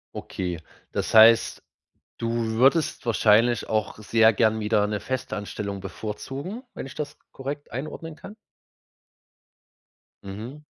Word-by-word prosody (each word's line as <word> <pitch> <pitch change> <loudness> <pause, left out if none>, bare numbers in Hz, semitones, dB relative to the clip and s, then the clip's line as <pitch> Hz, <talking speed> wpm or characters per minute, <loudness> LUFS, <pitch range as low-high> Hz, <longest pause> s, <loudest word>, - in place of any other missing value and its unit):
Okay, 90 -3 -4 0.3
das - - -2
heißt, 115 +1 +7 0.6
du 115 0 -2 0.2
würdest 135 +8 +2
wahrscheinlich 115 +1 +3
auch 110 -2 -1
sehr 110 +1 +4
gerne 110 +1 +2
wieder 105 -1 +2
'ne 105 -1 -2
Festanstellung 105 -5 -4
bevorzugen, 135 - -6
wenn - - -6
ich 135 - -10
das 145 0 -5
korrekt 140 +2 -6
einordnen 155 +4 -6
kann? 205 +6 -11 1.9
Mhm. 110 +10 -8
115 Hz, 110 wpm, -25 LUFS, 105-135 Hz, 1.9 s, heißt